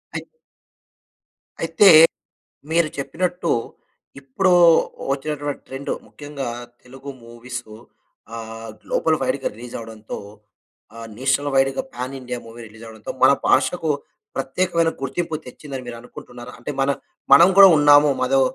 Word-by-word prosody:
అయి - - -4 1.4
అయితే, 205 - +5 0.8
మీరు 165 -1 +2
చెప్పినట్టు, 175 +4 -2 0.7
ఇప్పుడూ 140 +8 0 0.6
ఒచ్చినటువంటి 145 +1 -4
ట్రెండు, 135 +1 -5
ముఖ్యంగా 145 -3 -7 0.3
తెలుగు 135 +2 -11
మూవీసు 120 -1 -9 0.6
ఆహ్, 115 0 -8
గ్లోబల్ 160 -1 0
వైడుగా 130 +1 -1
రిలీజవడంతో 115 -2 -8 0.8
ఆహ్, 115 0 -9
నేషనల్ 135 +3 0
వైడుగా 135 - +2
పాన్ 130 +2 -5
ఇండియా 125 -1 -5
మూవీ 115 +1 -12
రిలీజవడంతో, 110 0 -10
మన - - +8 0.2
భాషకు 155 +4 +2 0.5
ప్రత్యేకమైన 165 +4 0
గుర్తింపు 155 +5 -3
తెచ్చిందని 135 0 -8
మీరు 120 -1 -7
అనుకుంటున్నారా? 125 0 -12
అంటే, 120 - -6
మన 135 +1 +2 0.4
మనం 140 +6 +9
కూడా 195 -1 +11
ఉన్నాము. 145 0 +6
మాదో 135 +1 +2
135 Hz, 110 wpm, -21 LUFS, 120-150 Hz, 1.4 s, కూడా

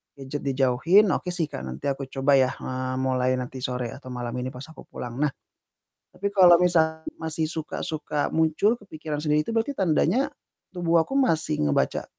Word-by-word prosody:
gadget 140 +1 -6
dijauhin, 135 +10 +4
ok - - -1
sih, 175 -2 0
Kak, - - -5
nanti 65 +1 -7
aku 135 0 -5
coba 135 +1 +3
ya, 130 - +4
eee, 130 0 -4
mulai 130 -1 +1
nanti 130 +1 -5
sore 125 -2 -3
atau 135 - -11
malam 125 -1 -4
ini 125 - -3
pas 125 0 -9
aku - - -14
pulang. 120 +1 -7
Nah, 150 - +3 0.9
tapi 200 +1 -2
kalau 185 -3 +7
misal 160 -3 +2 0.2
masih 160 0 -1
suka 160 -2 -4
suka 150 -3 -2
muncul, 160 +9 +2
kepikiran 155 -7 -6
sendiri 150 0 +1
itu - - -5
berarti 230 +5 0
tandanya 190 - +2 0.4
tubuh 170 -2 +2
aku 270 - -4
masih 160 - +1
ngebaca 70 - 0
150 Hz, 175 wpm, -25 LUFS, 130-175 Hz, 0.9 s, kalau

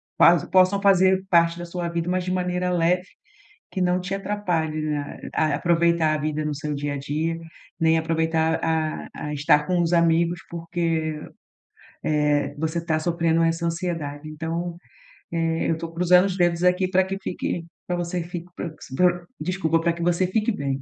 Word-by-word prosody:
pa 175 0 +5
possam 185 +1 +4
fazer 190 -1 +4
parte 170 -2 +3
da 175 - -6
sua 175 0 -4
vida, 170 0 -2
mas 185 0 0
de 185 - -3
maneira 180 0 -1
leve, 180 +1 +1 0.6
que 190 - -4
não 180 0 +2
te 185 +2 -4
atrapalhe, 175 -6 -1
né, 150 -2 -3
a 155 -2 +2
aproveitar 170 0 +2
a - - -1
vida 155 +1 -2
no 150 -1 -2
seu 150 +1 -4
dia 145 0 -3
a 140 - -3
dia, 155 +4 -2 0.4
nem 160 0 +4
aproveitar 160 0 +1
a 160 -1 -1
a 150 - -5
estar 150 0 +3
com 180 -1 +1
os 170 0 +1
amigos, 170 +1 +3
porque, 165 -2 -2 0.9
eh, 150 -1 +1
você 160 +2 -2
tá 155 -2 0
sofrendo 165 0 +1
essa 165 +1 0
ansiedade. 165 -4 -3
Então, 165 +2 -4 0.6
eh, 165 -1 0
eu 165 - +1
tô 165 0 -6
cruzando 180 +2 +5
os 195 -1 -2
dedos 175 -1 +2
aqui 180 +1 +3
pra 185 0 +3
que 190 +1 -4
fique 175 -2 -3 0.2
pra 180 - -1
você 175 0 -2
fique 175 0 -7
pro 165 -2 -5 0.2
pro 175 +1 +2
desculpa, 165 -1 0
pra 170 +1 +1
que 170 - -8
você 175 +2 +2
fique 215 +4 +1
bem. 140 -7 -3
170 Hz, 180 wpm, -24 LUFS, 160-180 Hz, 0.9 s, pa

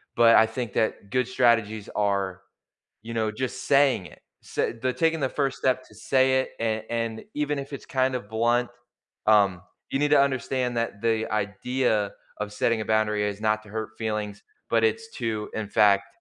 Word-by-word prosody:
but 115 -1 +6
I 110 - +7
think 115 -1 -5
that 105 -2 -1
good 125 -1 +1
strategies 115 -4 +2
are, 100 -3 0 0.6
you 115 +1 -7
know, 110 -1 0
just 130 +3 -4
saying 140 -9 +4
it, - - -15 0.2
s - - -13 0.2
they're 130 0 +1
taking 165 +3 +1
the 135 - +1
first 135 -1 -1
step 130 0 +1
to 105 - -18
say 130 +4 +2
it - - -4
and 110 -1 -1
and 115 -1 -2
even 150 -1 -1
if 140 +1 -9
it's 140 - -7
kinda 130 -1 +1
blunt, 120 +3 +1 0.6
um, 100 -4 +4 0.3
you 135 - 0
need 145 0 +2
to 145 - +6
understand 130 -2 0
that 115 -3 -3
the 110 -1 +1
idea 105 +1 0 0.3
of 105 0 -4
setting 115 +1 +1
a - - -2
boundary 110 -1 +1
is 105 0 -3
not 110 0 +1
to 105 - -16
hurt 110 +1 -4
feelings, 105 -2 -3 0.3
but, 115 -1 +3
it's 225 - 0
to, 110 -4 -2
in 110 -2 -3
fact 100 -1 +4
115 Hz, 185 wpm, -26 LUFS, 105-130 Hz, 0.6 s, I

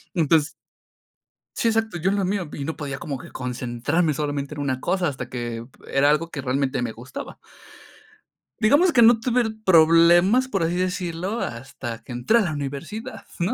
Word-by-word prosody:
Entonces 160 -2 +2 1.0
Sí, 230 - +1
exacto, 225 -4 0
yo 175 +3 0
en 200 - +1
lo 200 - 0
mío, 185 -4 -2
y 140 - -5
no 160 +3 -4
podía 140 -3 -5
como 145 -6 -4
que - - -12
concentrarme 125 +6 -1
solamente 145 0 -3
en 145 - -5
una 130 -2 -1
cosa 180 +4 0
hasta 140 - -6
que 120 -2 -5
p - - -19
era 140 +1 +5
algo 150 +3 +1
que 145 - -5
realmente 130 0 -1
me 115 -2 -3
gustaba. 125 +4 -9 1.2
Digamos 290 +11 +4
que 240 - +4
no 230 0 +7
tuve 250 +1 +2
r 220 -2 -1
problemas, 175 +7 +5
por 195 -8 0
así 165 +2 0
decirlo, 180 +2 -2
hasta 120 - -6
que - - -11
entré 125 - +2
a - - +3
la 175 -7 -1
universidad, 155 - -6
¿no?, 180 +7 0
165 Hz, 185 wpm, -23 LUFS, 135-195 Hz, 1.2 s, no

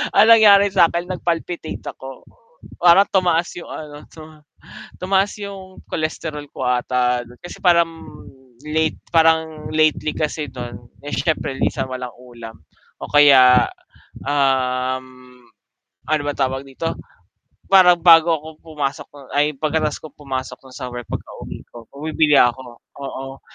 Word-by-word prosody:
Ang 220 - +6
nangyari 205 -3 +7
sakin 175 0 +2
nag 185 - -5
palpitate 170 -1 -3
ako. 135 -1 -11 0.6
Parang 180 +3 +6
tumaas 175 -3 +1
yung 175 - -9
ano, 150 -1 -9
tuma 155 -1 -14 0.6
tumaas 195 +2 0
yung 190 -2 -9
cholesterol 155 -1 -4
ko 130 - -4
ata 125 0 0
nun, 120 +1 -16
kasi 175 - -10
parang 170 -2 +4 0.7
late 155 +1 -1
parang 160 -1 +1
lately 155 0 +1
kasi 150 -2 -3
dun, 120 -2 -9 0.2
eh 145 - -6
syempre 155 -5 -2
minsan - - -1
walang 125 -1 -6
ulam 120 -3 -12 0.4
o - - -7
kaya, 135 -4 +6 0.6
um, 130 -2 0 1.0
ano 155 -2 +1
ba 145 - -2
tawag 135 0 -2
dito, 165 +5 -4 0.8
parang 180 -2 +6
bago 165 -1 +6
ako 155 0 -7 0.2
pumasok 150 -4 -4 0.3
ay 150 +1 +1
pagkatapos 155 0 -1
kong 155 -2 -13
pumasok 130 -2 -5 0.2
sa 125 - -6
work 120 -1 -8
pagkauwi - - -8
ko 120 - -12
bumibili 150 +1 +1
ako, 120 -1 +1 0.2
oo. 135 0 -7
150 Hz, 130 wpm, -20 LUFS, 130-165 Hz, 1.0 s, nangyari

